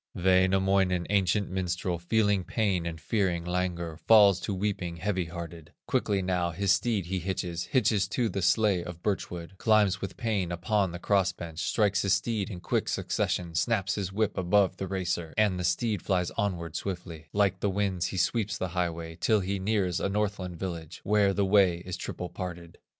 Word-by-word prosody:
Wainamoinen, 95 0 +3
ancient 100 0 +1
minstrel, 90 -1 -2
Feeling 100 +1 +1
pain 95 -5 0
and 80 -1 -5
fearing 85 0 0
languor, 90 -2 -2
Falls 100 +1 +6
to - - -4
weeping, 95 -3 -2
heavy 95 -1 -1
hearted; 85 -1 -8
Quickly 105 -7 0
now 90 -1 0
his 95 +3 0
steed 110 -6 +1
he 95 +2 -2
hitches, 90 -1 -3
Hitches 105 -3 +2
to 115 +3 0
the 100 -3 -3
sledge 95 +1 +3
of 85 -1 -9
birch 100 -3 -1
wood, 90 +2 -8
Climbs 105 -4 +3
with 95 - -5
pain 105 -7 -1
upon 95 +2 0
the 85 - -5
cross 95 -1 +1
bench, 85 -2 -8
Strikes 100 +1 +1
his 100 -1 +3
steed 105 +2 -2
in 90 -4 -7
quick 80 - -1
succession, 85 -2 -1
Snaps 100 +3 +1
his 95 -3 -3
whip 105 0 0
above 95 +2 +2
the 95 - -4
racer, 90 -3 -3
And 105 -4 +2
the - - -2
steed 105 +3 0
flies 90 -3 0
onward 85 -5 -2
swiftly; 85 -5 -5
Like 100 -2 +1
the 100 - 0
winds 95 -3 0
he 95 - -5
sweeps 105 +2 0
the 95 - -3
highway, 85 -2 -3
Till 110 +2 +3
he 95 +1 -2
nears 95 -3 0
a - - -1
Northland 100 -4 -2
village, 85 -3 -6
Where 105 -1 +3
the 100 0 +1
way 95 -3 +3
is 90 -1 -4
triple 90 - -5
parted. 85 -2 -7
95 Hz, 185 wpm, -28 LUFS, 85-100 Hz, -, Falls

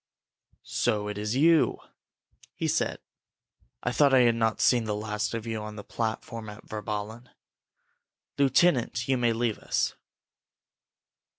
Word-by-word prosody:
"So 105 -1 -1
it 105 0 -5
is 105 +3 -2
you?" 160 +3 +4 0.8
he - - -2
said. - - 0 0.9
"I 125 - 0
thought 135 +2 +4
I 130 - +7
had 120 -1 +5
not 115 -1 0
seen 120 -3 +3
the 105 -1 -1
last 105 +2 -2
of 115 -1 -4
you 110 -1 -3
on 105 0 -7
the 100 - -8
platform 110 0 -4
at 105 0 -11
Virballen! 105 +3 -5 1.1
Lieutenant, 135 -4 +2
you 135 - +2
may 120 -2 +2
leave 115 -1 -1
us." - - 0
115 Hz, 135 wpm, -27 LUFS, 105-120 Hz, 1.1 s, I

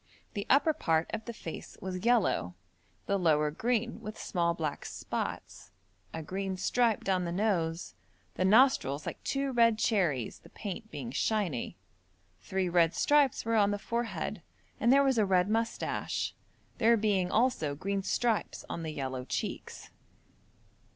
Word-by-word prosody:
The 200 -2 -4
upper 290 +4 +5
part 165 - 0
of 220 - -3
the 235 - -4
face 170 -7 -8
was 185 0 -5
yellow, 225 - +2 0.5
the 200 0 0
lower 150 -4 +3
green 235 +6 -1
with 215 0 -7
small 170 -2 0
black 155 -4 -3
spots, - - -5 0.4
a 160 - -5
green 190 +3 -3
stripe 235 +2 +1
down 185 -2 +1
the 170 - -3
nose, 175 -4 -1 0.4
the - - -1
nostrils 200 - +4
like - - -6
two 275 0 -1
red 230 -3 +4
cherries, 175 - 0
the - - -17
paint 220 +2 -6
being 235 - -6
shiny. 195 - -1 0.6
Three 190 - -1
red 170 -2 +3
stripes 290 -6 +3
were 230 0 +1
on 205 -2 +4
the 205 - 0
forehead, 235 +3 -3 0.4
and 235 - +4
there 280 +1 +6
was 265 -4 +2
a - - +5
red 185 -1 +3
moustache, 225 +2 -1 0.5
there 230 +1 +5
being 200 -4 +1
also 210 - +1
green 195 +6 -2
stripes 225 +3 -1
on - - -5
the 160 - -4
yellow 130 -4 -4
cheeks. 125 - -5
200 Hz, 150 wpm, -30 LUFS, 170-230 Hz, 0.6 s, there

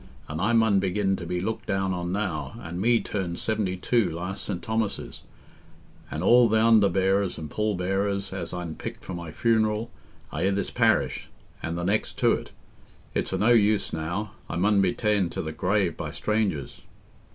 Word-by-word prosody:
an' 75 +1 -4
I 105 +6 +2
mun 110 -4 +4
begin 95 +1 +1
to 85 - -6
be 90 +1 -1
looked 110 +4 -3
down 95 -1 0
on 90 -1 -3
now, 95 +1 -3
an' 85 -3 -5
me 115 +2 +4
turned 90 -4 -3
seventy 105 -4 -1
two 115 +3 +2
last 90 +4 -4
St. 95 -4 -3
Thomas's, 110 -1 -3 0.9
an' 75 - -4
all 120 +3 +6
th' - - -1
underbearers 100 -4 +3
and 75 -2 -7
pall 105 -1 0
bearers 100 +2 -1
as 90 -3 -4
I'n 90 -2 -4
picked - - -7
for 95 - -5
my 85 -2 -6
funeral 110 +2 +1 0.4
are 80 - -3
i' 95 - +3
this 100 0 -1
parish - - +1 0.3
and 85 +1 -3
the 85 - -3
next 100 +4 0
to - - +4
't.... - - -7 0.6
It's - - -1
o' - - 0
no 110 - +3
use 105 -2 +3
now... 85 +7 -3 0.2
I - - -3
mun 100 +3 +3
be 95 -2 +3
ta'en 105 -5 +1
to - - -4
the 80 - -4
grave 90 +1 +1
by - - -4
strangers." 105 -9 -1
95 Hz, 185 wpm, -26 LUFS, 90-110 Hz, 0.9 s, all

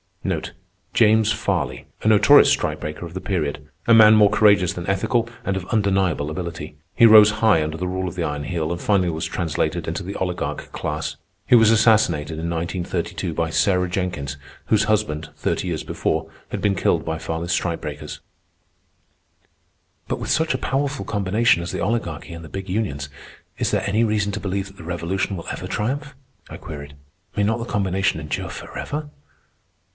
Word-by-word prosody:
James 110 -1 +4
Farley—a 105 -1 -3
notorious 110 -2 +7
strike - - 0
breaker 75 +3 -5
of 85 - -10
the 95 - -4
period. 80 -8 -2 0.2
A 115 - +6
man 110 -1 +8
more 105 -1 +6
courageous 105 -4 +4
than 90 0 -6
ethical, 115 +5 +1 0.2
and 100 - 0
of 95 -2 -4
undeniable 95 -8 +1
ability. 85 0 -6 0.2
He 115 - +6
rose 105 -2 +9
high 105 -7 +3
under 80 +1 -4
the 90 +2 -3
rule 95 +1 -2
of 90 - -6
the 90 - -2
Iron 75 -2 -3
Heel 80 -1 -2
and 85 - -3
finally 95 -4 +2
was 80 -1 -3
translated 80 -1 -2
into 80 +4 -3
the 100 +3 -6
oligarch 90 -1 -3
class. 75 -1 -4 0.3
He 125 - +6
was 115 -2 +6
assassinated 105 -9 +3
in 85 +1 -3
1932 85 +1 -3
by 80 0 -1
Sarah 90 -1 +2
Jenkins, 90 -7 -3 0.3
whose 110 0 +2
husband, 100 -8 0
thirty - - -2
years 85 -3 -2
before, - - -2 0.2
had - - -4
been 100 -2 +2
killed - - +1
by 80 0 -2
Farley's 80 +1 -3
strike 85 -1 -1
breakers. 75 0 -7 1.9
"But - - -2
with - - -5
such 160 -3 +2
a - - -3
powerful 140 0 -1
combination 105 -1 +2
as 85 - -5
the - - -3
Oligarchy 85 -6 -2
and 85 0 -8
the - - -11
big 95 0 -6
unions, 90 -9 -2 0.5
is - - 0
there - - 0
any 110 +3 +2
reason 105 -2 +1
to 105 - -4
believe 95 0 -3
that 100 0 -16
the - - -10
Revolution 90 +4 -2
will 85 - -8
ever - - -5
triumph?" 140 +6 -3 0.3
I - - -8
queried. 70 -1 -9 0.4
"May 105 - +1
not 110 +3 +1
the 115 - -4
combination 95 -5 0
endure 75 -2 -4
forever?" 150 0 -6
95 Hz, 180 wpm, -22 LUFS, 85-105 Hz, 1.9 s, rose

